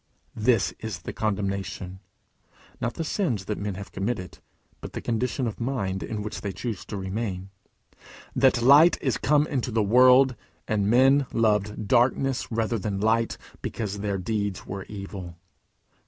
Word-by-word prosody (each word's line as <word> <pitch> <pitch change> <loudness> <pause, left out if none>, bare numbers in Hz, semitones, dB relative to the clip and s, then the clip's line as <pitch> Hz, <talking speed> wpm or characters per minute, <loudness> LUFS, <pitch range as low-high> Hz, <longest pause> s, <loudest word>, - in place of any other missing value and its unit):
"This 110 -1 +2
is 105 -6 -6
the - - -5
condemnation," 100 -3 -3 0.8
(not 120 0 -2
the 165 - -2
sins 140 - -1
that 105 - -3
men 100 -2 -3
have 100 +1 -8
committed, 95 -3 -4 0.4
but - - -9
the - - -4
condition 125 +3 -1
of 110 - -4
mind 110 -7 -2
in 105 -2 -4
which 105 - -5
they 100 - -3
choose 110 +1 -5
to 105 - -5
remain,) 95 -1 -4 0.8
"that 130 -2 +3
light 145 +7 +7
is 130 - -1
come 150 +1 +3
into 130 -5 -2
the 110 -2 +1
world, 125 +4 +6 0.3
and 105 -2 +1
men 135 +3 +5
loved 105 -2 +1
darkness 125 +3 +2
rather 115 0 0
than 100 -1 -3
light, 110 +2 +1 0.2
because 105 -3 -4
their 100 -1 -1
deeds 100 0 -2
were 95 0 -6
evil." 95 -4 -8
110 Hz, 155 wpm, -26 LUFS, 100-125 Hz, 0.8 s, light